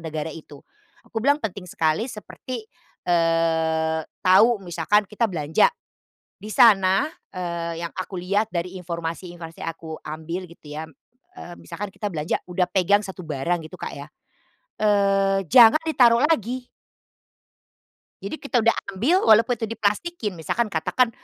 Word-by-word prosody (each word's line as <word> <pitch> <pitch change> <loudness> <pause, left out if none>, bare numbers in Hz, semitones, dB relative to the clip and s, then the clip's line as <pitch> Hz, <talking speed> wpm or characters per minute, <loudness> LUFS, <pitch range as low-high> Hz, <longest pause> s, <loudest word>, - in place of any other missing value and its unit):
negara 160 -1 -4
itu. 150 -2 -13 0.4
Aku 225 - -5
bilang 285 +5 +3
penting 200 -9 -6
sekali 160 +9 0
seperti, 220 +2 -8 0.4
eee, 160 -1 +1 0.2
tahu 210 +6 +6
misalkan 205 +4 +1
kita 210 +3 -1
belanja 160 - +2 0.7
di 215 +1 -8
sana, 195 +2 +5 0.2
eee, 170 -2 -4
yang 170 0 -5
aku 185 -1 -5
lihat 200 +5 0
dari 180 +1 -3
informasi-informasi 170 -1 -6
aku 165 -1 -6
ambil, 160 +4 -5
gitu 170 -3 -15
ya, 155 - -4 0.6
eee, 175 - -9
misalkan 205 +1 -7
kita 205 0 -5
belanja 150 0 -1
udah 180 0 -1
pegang 195 +2 +3
1 190 -3 -8
barang, 160 +3 -1
gitu - - -11
Kak - - -6
ya, 140 +1 -9 0.7
eee, 195 -2 +3
jangan 235 +4 +8
ditaruh 245 -6 +4
lagi. 255 -5 -1 1.6
Jadi, 200 +10 -4
kita 255 -5 0
udah 230 - +5 0.2
ambil 275 - +3
walaupun 225 +2 +5
itu 225 - -2
diplastikin, 215 - -2
misalkan 215 +8 -1
katakan, 210 +9 +1
185 Hz, 135 wpm, -23 LUFS, 165-220 Hz, 1.6 s, jangan